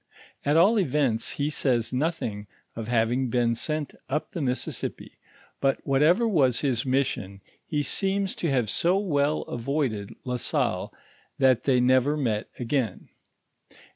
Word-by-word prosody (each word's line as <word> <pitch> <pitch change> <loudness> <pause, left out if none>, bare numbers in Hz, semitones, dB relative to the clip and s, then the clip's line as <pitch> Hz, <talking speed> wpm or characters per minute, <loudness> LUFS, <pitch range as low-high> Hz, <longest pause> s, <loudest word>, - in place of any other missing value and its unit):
At 145 +2 +2
all 205 +7 +5
events, 135 - +1
he 145 +1 -1
says 125 -5 0
nothing 125 -8 -2 0.3
of 115 -1 -5
having 120 +2 +1
been 120 0 +2
sent 155 +4 -3 0.2
up 150 +3 -2
the 175 - -5
Missiesippi; 125 -2 -3 0.4
but 135 -1 +1
what 135 0 +2
ever 180 +10 +4
was 135 - +2
his 130 -3 0
mission, 130 -7 -1 0.3
he 150 -2 -1
seems 195 +3 0
to 170 - -1
have 125 -5 +1
so 175 - +2
well 150 -6 +1
avoided 120 -5 -3
La 125 -1 -1
Salle, - - -1 0.5
that 130 -3 +3
thoy 130 -3 +3
never 130 +4 +3
met 110 -7 -1
again. 120 -5 -2
135 Hz, 140 wpm, -26 LUFS, 120-150 Hz, 0.5 s, all